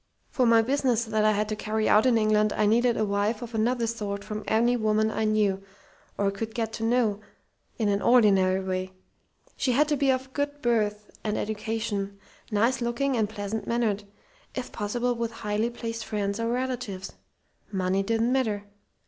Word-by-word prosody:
"For 255 Hz, -3 st, +2 dB
my 230 Hz, -1 st, +6 dB
business 250 Hz, -2 st, +1 dB
that 220 Hz, -1 st, 0 dB
I 215 Hz, -, +5 dB
had 210 Hz, +1 st, 0 dB
to 215 Hz, -, -1 dB
carry 215 Hz, +1 st, -1 dB
out 215 Hz, +4 st, +5 dB
in 240 Hz, -3 st, +4 dB
England 215 Hz, -1 st, +3 dB
I 210 Hz, -, +1 dB
needed 235 Hz, +3 st, +3 dB
a 215 Hz, -, +1 dB
wife 205 Hz, +3 st, 0 dB
of 235 Hz, 0 st, -8 dB
another 230 Hz, +2 st, +1 dB
sort 205 Hz, -3 st, -3 dB
from 215 Hz, 0 st, -5 dB
any 235 Hz, +3 st, +3 dB
woman 220 Hz, -1 st, +1 dB
I 220 Hz, -, -1 dB
knew, 210 Hz, -3 st, +2 dB, 0.6 s
or 200 Hz, -1 st, +1 dB
could 220 Hz, +3 st, -5 dB
get 225 Hz, -2 st, -2 dB
to 225 Hz, -, -4 dB
know, 225 Hz, -3 st, +2 dB, 0.6 s
in 220 Hz, -, 0 dB
an 200 Hz, 0 st, +1 dB
ordinary 195 Hz, -6 st, +4 dB
way; 185 Hz, 0 st, -3 dB, 0.6 s
she 255 Hz, -, 0 dB
had 295 Hz, +4 st, +3 dB
to 295 Hz, -, +2 dB
be 275 Hz, -1 st, +1 dB
of 260 Hz, 0 st, -3 dB
good 290 Hz, 0 st, -2 dB
birth 210 Hz, -3 st, 0 dB
and 210 Hz, -1 st, -1 dB
education, 215 Hz, -2 st, -3 dB, 0.3 s
nice 235 Hz, +4 st, +2 dB
looking 250 Hz, +3 st, 0 dB
and 220 Hz, -3 st, +1 dB
pleasant 210 Hz, +1 st, -4 dB
mannered 220 Hz, -4 st, 0 dB, 0.5 s
if 255 Hz, -1 st, -4 dB
possible 240 Hz, +4 st, -1 dB
with 230 Hz, -1 st, -3 dB
highly 210 Hz, +3 st, 0 dB
placed 230 Hz, -1 st, -5 dB
friends 200 Hz, -1 st, -2 dB
or 230 Hz, 0 st, -1 dB
relatives. 245 Hz, -6 st, -3 dB, 0.6 s
Money 190 Hz, 0 st, 0 dB
didn't 230 Hz, +4 st, +1 dB
matter. 220 Hz, -6 st, 0 dB
220 Hz, 180 wpm, -27 LUFS, 210-240 Hz, 0.6 s, my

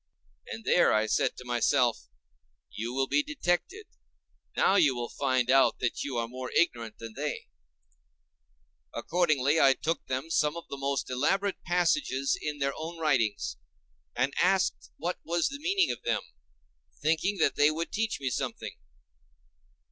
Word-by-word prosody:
And 225 Hz, -, -7 dB
there, 180 Hz, -, +4 dB
I 110 Hz, 0 st, +3 dB
said -, -, 0 dB
to 125 Hz, -, -10 dB
myself, 120 Hz, 0 st, +1 dB, 0.6 s
you 115 Hz, +2 st, -4 dB
will 135 Hz, +1 st, 0 dB
be 290 Hz, -, +2 dB
detected; 295 Hz, -, -2 dB, 0.7 s
now -, -, +4 dB
you 155 Hz, -10 st, +4 dB
will 120 Hz, -1 st, -4 dB
find 130 Hz, -2 st, 0 dB
out 135 Hz, 0 st, +4 dB
that 125 Hz, -, -2 dB
you 135 Hz, -4 st, -4 dB
are 115 Hz, 0 st, -1 dB
more 125 Hz, +1 st, -6 dB
ignorant 115 Hz, -9 st, 0 dB
than 115 Hz, -1 st, -9 dB
they 145 Hz, -, -4 dB, 1.5 s
are. -, -, -3 dB
Accordingly, 155 Hz, -2 st, +2 dB
I 135 Hz, -2 st, +6 dB
took 165 Hz, +1 st, -3 dB
them 130 Hz, +5 st, -3 dB
some 150 Hz, 0 st, +1 dB
of 170 Hz, -, -9 dB
the 140 Hz, -, -5 dB
most 140 Hz, -1 st, -2 dB
elaborate 195 Hz, +10 st, 0 dB
passages 175 Hz, -, +1 dB
in 150 Hz, -1 st, -3 dB
their 140 Hz, -1 st, -1 dB
own 165 Hz, +2 st, -6 dB
writings, 105 Hz, -, 0 dB, 0.6 s
and 140 Hz, +2 st, 0 dB
asked 190 Hz, +1 st, +1 dB
what 175 Hz, +3 st, -3 dB
was 170 Hz, +1 st, 0 dB
the 280 Hz, +1 st, -7 dB
meaning 370 Hz, +2 st, +2 dB
of -, -, -6 dB
them—thinking 75 Hz, -, -3 dB
that 160 Hz, -, +2 dB
they 145 Hz, +1 st, +5 dB
would 165 Hz, +2 st, -3 dB
teach 220 Hz, 0 st, -1 dB
me 135 Hz, -2 st, -2 dB
something. -, -, -4 dB
140 Hz, 155 wpm, -29 LUFS, 120-175 Hz, 1.5 s, I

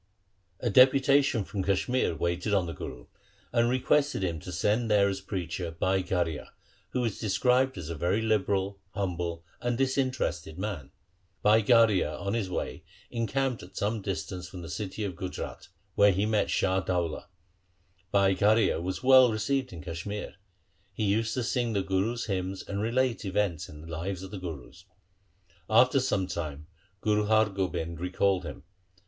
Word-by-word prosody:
A 120 Hz, -, -1 dB
deputation 135 Hz, 0 st, +5 dB
from 95 Hz, 0 st, -4 dB
Kashmir 100 Hz, +1 st, +1 dB
waited 85 Hz, +6 st, 0 dB
on 95 Hz, -3 st, +2 dB
the 85 Hz, -, -5 dB
Guru, 60 Hz, -5 st, -8 dB, 0.5 s
and 120 Hz, -1 st, +3 dB
requested 130 Hz, -1 st, +2 dB
him 85 Hz, -4 st, -1 dB
to 90 Hz, -, -8 dB
send 105 Hz, +7 st, +1 dB
there 100 Hz, -1 st, +4 dB
as 95 Hz, -1 st, -2 dB
preacher 90 Hz, -3 st, -4 dB
Bhai 95 Hz, +1 st, +2 dB
Garhia, 85 Hz, -5 st, -2 dB, 0.4 s
who 125 Hz, -1 st, -1 dB
is 110 Hz, -, -3 dB
described 125 Hz, +4 st, +2 dB
as 85 Hz, -2 st, -5 dB
a -, -, -4 dB
very 90 Hz, +7 st, +1 dB
liberal, 100 Hz, -3 st, 0 dB, 0.2 s
humble, 85 Hz, -3 st, -3 dB, 0.2 s
and 120 Hz, -1 st, -1 dB
disinterested 130 Hz, -, -1 dB
man. 95 Hz, -8 st, -4 dB, 0.5 s
Bhai 110 Hz, +2 st, +6 dB
Garhia 105 Hz, -9 st, +4 dB
on 100 Hz, 0 st, -2 dB
his 110 Hz, -5 st, -1 dB
way -, -, -4 dB, 0.3 s
encamped 125 Hz, +2 st, -1 dB
at 90 Hz, +2 st, -13 dB
some 105 Hz, +2 st, -1 dB
distance 90 Hz, -1 st, -4 dB
from 90 Hz, -1 st, -8 dB
the 85 Hz, -, -7 dB
city 105 Hz, 0 st, -4 dB
of 95 Hz, -4 st, -3 dB
Gujrat, 90 Hz, +1 st, -6 dB, 0.3 s
where 100 Hz, 0 st, +5 dB
he 95 Hz, +2 st, +1 dB
met 110 Hz, -1 st, +1 dB
Shah 95 Hz, 0 st, +2 dB
Daula. 90 Hz, -3 st, -2 dB, 0.8 s
Bhai 100 Hz, -1 st, +4 dB
Garhia 105 Hz, -1 st, +3 dB
was 95 Hz, +5 st, -4 dB
well 130 Hz, -2 st, +7 dB
received 130 Hz, +5 st, -1 dB
in 80 Hz, -4 st, -9 dB
Kashmir. 90 Hz, +6 st, -5 dB, 0.6 s
He 110 Hz, -, -4 dB
used 110 Hz, +2 st, +1 dB
to 125 Hz, -, -1 dB
sing 120 Hz, -1 st, 0 dB
the 100 Hz, -2 st, +1 dB
Gurus' 100 Hz, +5 st, -1 dB
hymns 95 Hz, -2 st, -3 dB
and 100 Hz, 0 st, -3 dB
relate 120 Hz, +2 st, 0 dB
events 95 Hz, -4 st, -1 dB
in 75 Hz, 0 st, -11 dB
the 80 Hz, -, -11 dB
lives 90 Hz, +3 st, -4 dB
of 95 Hz, -, -8 dB
the 100 Hz, -, -6 dB
Gurus. 85 Hz, 0 st, -8 dB, 0.8 s
After 125 Hz, +5 st, +5 dB
some 105 Hz, -7 st, 0 dB
time 75 Hz, -4 st, -5 dB, 0.4 s
Guru 105 Hz, -1 st, +2 dB
Har 110 Hz, -1 st, +4 dB
Gobind 85 Hz, -4 st, -3 dB
recalled 90 Hz, +1 st, +1 dB
him. -, -, -8 dB
100 Hz, 165 wpm, -28 LUFS, 90-115 Hz, 0.8 s, well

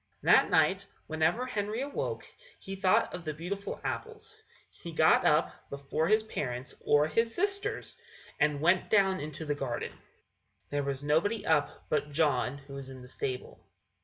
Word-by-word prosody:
That -, -, +6 dB
night, -, -, +3 dB, 0.2 s
whenever 160 Hz, +10 st, +1 dB
Henry 215 Hz, -1 st, -2 dB
awoke, 280 Hz, +1 st, -3 dB, 0.3 s
he 195 Hz, -, -6 dB
thought 190 Hz, -1 st, +2 dB
of 180 Hz, -, -6 dB
the 155 Hz, -2 st, -4 dB
beautiful 195 Hz, +5 st, -5 dB
apples. 440 Hz, -1 st, -5 dB, 0.3 s
He 170 Hz, -, -9 dB
got 160 Hz, 0 st, +5 dB
up 150 Hz, +1 st, +3 dB, 0.2 s
before 140 Hz, +3 st, -2 dB
his 215 Hz, +1 st, +4 dB
parents, 130 Hz, -, -4 dB
or 145 Hz, 0 st, +4 dB
his 230 Hz, +8 st, 0 dB
sisters, 400 Hz, +2 st, -1 dB, 0.4 s
and 150 Hz, -1 st, +2 dB
went 175 Hz, +3 st, +3 dB
down 195 Hz, -3 st, +3 dB
into 155 Hz, +2 st, -5 dB
the 150 Hz, -, 0 dB
garden. 135 Hz, -4 st, -3 dB, 0.8 s
There 145 Hz, 0 st, 0 dB
was 140 Hz, 0 st, -3 dB
nobody 175 Hz, +10 st, +1 dB
up 150 Hz, -3 st, +1 dB
but 150 Hz, -1 st, -1 dB
John, 140 Hz, -4 st, +1 dB
who 140 Hz, 0 st, -13 dB
was 135 Hz, -1 st, -7 dB
in 130 Hz, -1 st, -10 dB
the -, -, -11 dB
stable. 130 Hz, 0 st, -5 dB
160 Hz, 160 wpm, -30 LUFS, 145-205 Hz, 0.8 s, That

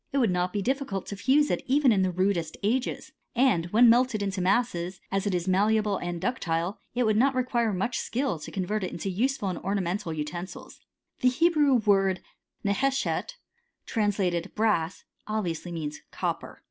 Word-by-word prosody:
It 280 Hz, -, -1 dB
would 235 Hz, -8 st, +3 dB
not 180 Hz, 0 st, 0 dB
be 205 Hz, 0 st, -2 dB
difficult 260 Hz, -7 st, -2 dB
to 200 Hz, -, -6 dB
fuse 275 Hz, +8 st, +3 dB
it -, -, 0 dB
even 270 Hz, 0 st, +4 dB
in 200 Hz, -3 st, +3 dB
tfaiift 185 Hz, -1 st, -1 dB
rudest 185 Hz, -4 st, 0 dB
ages: 255 Hz, +7 st, -1 dB, 0.2 s
and 240 Hz, -10 st, +3 dB
when 230 Hz, +7 st, +5 dB
melted 235 Hz, -2 st, +4 dB
into 195 Hz, -1 st, -2 dB
masses, 185 Hz, -2 st, 0 dB
as 195 Hz, +1 st, 0 dB
it 195 Hz, -, +1 dB
ii 175 Hz, -, +1 dB
malleable 205 Hz, +2 st, +2 dB
and 175 Hz, -1 st, -3 dB
ductile, 175 Hz, -5 st, -1 dB, 0.2 s
it 250 Hz, -, +2 dB
would 215 Hz, -2 st, +2 dB
not 265 Hz, +3 st, +3 dB
require 240 Hz, -3 st, +1 dB
much 200 Hz, +5 st, -1 dB
skil{. 255 Hz, -, -1 dB
to -, -, -6 dB
convert 195 Hz, +2 st, -2 dB
it 185 Hz, -, -3 dB
into 190 Hz, +3 st, -4 dB
useful 235 Hz, +1 st, 0 dB
and 180 Hz, -, -3 dB
ornamental 190 Hz, -3 st, -2 dB
utensils. 160 Hz, +4 st, -6 dB, 0.4 s
J^ 250 Hz, -, +4 dB
Hebrew 300 Hz, -1 st, +3 dB
word 195 Hz, -5 st, +2 dB, 0.4 s
JWHi 200 Hz, -, +2 dB
(necheshet) 270 Hz, -, 0 dB, 0.5 s
translated 195 Hz, -5 st, 0 dB
brass^ 200 Hz, -6 st, 0 dB, 0.2 s
olh. 215 Hz, 0 st, -1 dB
viously 170 Hz, 0 st, -4 dB
means 155 Hz, -3 st, -4 dB
copper. -, -, -4 dB
205 Hz, 175 wpm, -27 LUFS, 180-245 Hz, 0.5 s, when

